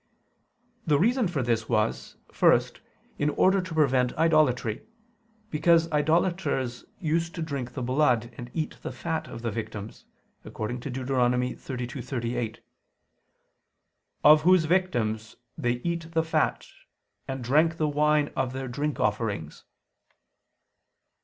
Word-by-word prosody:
The 150 -2 +4
reason 235 - +2
for 155 -7 -2
this 115 -2 -1
was, 110 -2 -1 0.2
first, - - +3 0.4
in 145 - +2
order 190 +5 +3
to 185 -2 -7
prevent 130 -5 +2
idolatry: 150 -9 +2 0.7
because 165 +1 +3
idolaters 150 -5 0 0.2
used 170 +1 -1
to 165 - -3
drink 140 -6 -4
the 130 - -3
blood 125 -3 +1
and 120 +1 -8
eat 155 -1 -3
the - - -5
fat 165 -1 -3
of 115 - -9
the 115 - -1
victims, 110 -1 -7 0.4
according 115 +4 -5
to 130 - -6
Deut. 130 0 -4
32:38: 125 -2 -2 1.6
"Of 150 +1 +8
whose 180 0 +5
victims 120 -12 0 0.2
they 120 0 0
eat 170 -1 -3
the 160 -1 +2
fat, 160 - 0 0.6
and 135 -2 -4
drank 155 +6 +3
the 155 - +1
wine 150 0 +2
of 130 -1 -1
their 130 0 -4
drink 145 +4 -3
offerings." 105 -7 -2
135 Hz, 125 wpm, -27 LUFS, 120-160 Hz, 1.6 s, Of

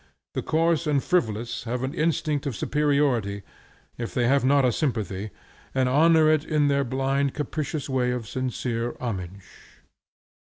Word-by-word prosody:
The - - -2
coarse 165 0 +1
and 145 -3 +2
frivolous 120 - -1
have 125 +2 -2
an 135 +2 -2
instinct 155 -3 0
of 130 - -3
superiority, 140 -10 +1 0.6
if 115 - -5
they 120 -1 +2
have 140 +1 +3
not 140 +1 +4
a 125 - +3
sympathy, 110 - -2 0.5
and 130 -1 +2
honor 160 +4 +5
it 155 -1 +3
in 150 -2 +1
their 140 0 +2
blind 135 +2 0
capricious 150 0 -3
way 130 -2 0
with 125 -2 -3
sincere 120 -1 -3
homage. 95 -5 -5
135 Hz, 150 wpm, -25 LUFS, 120-150 Hz, 0.6 s, honor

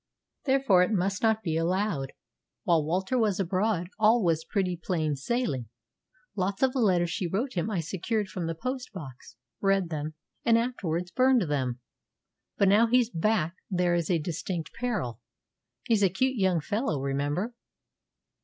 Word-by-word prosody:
Therefore 265 -9 +4
it 180 - +2
must 195 0 0
not 220 -1 +2
be 160 -3 -1
allowed. 170 -5 0 0.5
While 165 -3 +3
Walter 190 - 0
was 210 -4 +1
abroad 185 -1 0
all 220 +1 +5
was 165 -2 +1
pretty 180 0 -1
plain 160 -3 -1
sailing. 140 - -2 0.7
Lots 195 +4 -1
of 260 -1 +3
the 265 - -1
letters 180 -6 +3
she 180 - -2
wrote 230 +10 -2
him 180 +3 -1
I 190 -6 -1
secured 195 +6 -2
from 180 -3 -4
the 165 - -2
post 255 +7 -4
box, 135 - -10 0.3
read 195 -3 +2
them, 155 -1 -4 0.3
and 230 -1 +5
afterwards 180 -8 -2
burned 255 -1 +4
them. 130 -6 -2 0.8
But 200 - +4
now 215 +4 +5
he's 245 0 +3
back 170 -1 +1 0.2
there 180 -2 +1
is 170 -2 0
a 175 - +3
distinct 165 +1 -4
peril. 185 - -3 0.6
He's 225 -4 +2
a 195 - +5
cute 260 +9 0
young 190 -6 +2
fellow, 205 - -1
remember." 145 - -1
185 Hz, 160 wpm, -28 LUFS, 165-220 Hz, 0.8 s, all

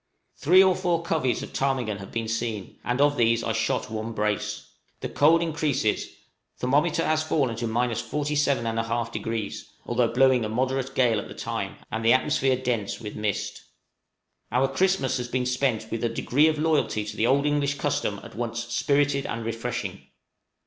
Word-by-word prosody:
Three 180 +6 +6
or 190 -1 +4
four 175 -3 0
coveys 150 -8 0
of - - -9
ptarmigan 125 -7 -1
have 100 - -9
been 115 -1 -2
seen, 115 -3 -3
and 125 +2 -1
of 145 0 +3
these 115 0 +3
I 115 - -1
shot 110 0 -1
one 110 +1 -4
brace. 105 -2 -2 0.3
The - - -2
cold 165 +3 +4
increases: 150 -9 0 0.5
thermometer 145 +6 +1
has 155 0 +2
fallen 140 -6 0
to 115 0 -2 0.3
47 145 +1 0
1/2°, 115 -1 -2 0.2
although 120 0 +2
blowing 130 0 +4
a 110 - -2
moderate 130 +3 -1
gale 120 -4 +3
at - - -6
the - - -10
time, - - -4 0.2
and 110 0 -2
the 115 - +6
atmosphere 135 0 +2
dense 120 -5 -2
with 105 -3 -7
mist. 105 -2 -2 0.9
Our 125 +3 +3
Christmas 135 -2 +1
has 125 -1 -3
been 125 +1 -1
spent 125 -3 0
with 115 - -3
a 120 - +2
degree 135 +6 +2
of 155 -1 +1
loyalty 145 -9 +1
to 105 0 -6
the 110 - +1
good - - +2
old 140 +2 +3
English 145 -1 +1
custom 140 -7 -1
at - - -11
once 120 0 -3
spirited 140 -1 +1
and 115 0 -4
refreshing. 115 -4 -4
125 Hz, 175 wpm, -26 LUFS, 115-145 Hz, 0.9 s, Three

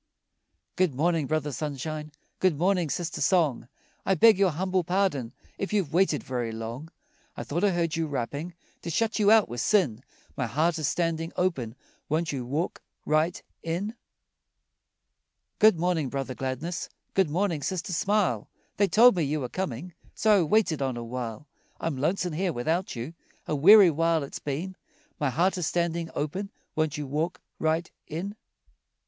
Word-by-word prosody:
Good 180 -7 +2
morning, 160 0 +1
Brother 155 -1 -1
Sunshine, 150 +2 -4 0.3
Good 185 -6 +2
morning, 180 -1 +2
Sister 170 +1 -3
Song, 155 -7 +2 0.4
I 195 - +2
beg 215 +3 +6
your 195 -2 +5
humble 185 +3 0
pardon 170 -10 0 0.3
If 195 - -3
you've 190 -8 0
waited 175 -4 +2
very 120 -3 -3
long. 115 +7 -6 0.5
I - - -4
thought 170 +6 -2
I 205 - +5
heard 170 -3 0
you 165 -1 -1
rapping, 145 +5 -4 0.3
To 170 - -5
shut 225 +7 0
you 205 -1 +4
out 220 -1 +6
were 120 - -5
sin, 130 - +2 0.3
My 125 - -1
heart 160 +8 +1
is 155 - 0
standing 165 -1 -1
open, 135 -11 -1 0.3
Won't 160 +2 0
you 130 -4 -4
walk 155 +7 -2 0.2
right 155 +3 +1 0.2
in? 175 +7 -2 1.7
Good 215 -4 +6
morning, 165 -5 0
Brother 135 -1 -3
Gladness, 135 +8 -4 0.2
Good 190 -5 +3
morning, 170 -1 0
Sister 180 +2 -3
Smile, 185 - +1 0.3
They 200 - +4
told 235 +3 +6
me 175 - 0
you 150 0 0
were 125 - -3
coming, 175 0 -4 0.2
So 215 -2 +4
I - - +3
waited 165 -3 +2
on 130 -3 -1
a 120 - -4
while. 115 +1 -5 0.3
I'm 165 -3 -2
lonesome 175 +5 0
here 180 +3 0
without 160 +9 -1
you, 120 +7 -5 0.3
A 155 - 0
weary 190 +5 +8
while 165 0 +1
it's 140 - -7
been, 160 +7 -4 0.4
My 145 - +1
heart 180 +7 +1
is 165 - -1
standing 170 -1 -1
open, 185 +7 -3 0.3
Won't 155 -2 0
you 150 - -3
walk 155 +6 -2 0.2
right 160 +2 0 0.2
in? 185 +7 -4
165 Hz, 165 wpm, -27 LUFS, 140-185 Hz, 1.7 s, weary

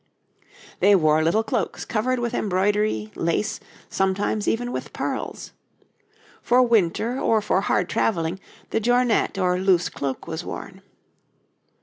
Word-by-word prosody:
They 200 0 +6
wore 155 -3 +3
little 205 +8 +2
cloaks 230 -2 -2
covered 250 +3 0
with 240 -1 -2
embroidery, 195 - 0
lace, 170 +5 -1 0.3
sometimes 195 +2 -1
even 245 +2 0
with - - -5
pearls. - - -4 0.9
For 250 +1 +4
winter 230 +2 +1
or 225 - +2
for 200 -2 +1
hard 180 -2 +1
travelling 170 -3 0 0.3
the - - +1
jornet 245 -2 +2
or 180 -1 +1
loose 185 -2 +2
cloak 135 -2 -4
was 165 +1 -5
worn. 190 +2 -8
200 Hz, 125 wpm, -23 LUFS, 175-225 Hz, 0.9 s, They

